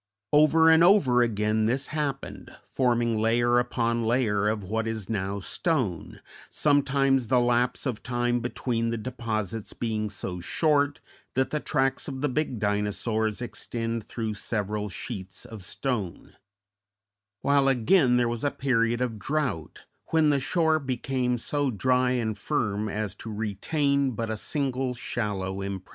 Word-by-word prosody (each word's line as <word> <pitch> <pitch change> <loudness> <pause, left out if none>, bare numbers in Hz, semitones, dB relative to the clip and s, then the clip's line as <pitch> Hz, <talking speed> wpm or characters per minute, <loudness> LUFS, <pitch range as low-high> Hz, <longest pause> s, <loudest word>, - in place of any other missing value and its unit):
Over 155 +2 +6
and 160 +1 +6
over 160 -10 +5
again 110 -1 +1
this 130 +4 0
happened, 150 -3 -3 0.2
forming 120 -3 +1
layer 120 +2 +3
upon 120 -1 0
layer 110 -3 +1
of 105 -1 -1
what 110 +4 -2
is 110 -2 -4
now 100 -1 -2
stone, 115 - -2 0.3
sometimes 135 -3 +2
the 125 +2 +4
lapse 120 +2 +1
of 125 -5 -2
time 120 0 0
between 120 -1 -2
the 115 - -1
deposits 110 -3 -4
being 110 -2 -2
so 90 -2 -5
short 145 - +1 0.4
that 130 0 +1
the 150 - 0
tracks 135 -3 0
of 130 -1 -5
the 150 - +1
big 140 -2 -1
Dinosaurs 105 +2 -1
extend 115 -1 -4
through 110 0 -4
several 105 0 -2
sheets 95 -2 -6
of 110 -3 -9
stone; 105 -3 -4 1.1
while 140 -1 +3
again 130 - +4
there 120 -1 +2
was 115 -1 -3
a 145 - +3
period 120 -4 +1
of 115 -4 -2
drouth 135 - -3 0.2
when 160 -2 +3
the 140 - +2
shore 160 +2 +2
became 130 -2 -1
so 145 +4 -1
dry 125 +2 +2
and 115 -4 -1
firm 110 -7 -1
as 105 -2 -3
to 110 +2 -8
retain 135 +6 0
but 115 0 -3
a - - -1
single 130 +1 -2
shallow 100 -5 -3
impression. 95 -1 -5
120 Hz, 145 wpm, -27 LUFS, 110-135 Hz, 1.1 s, Over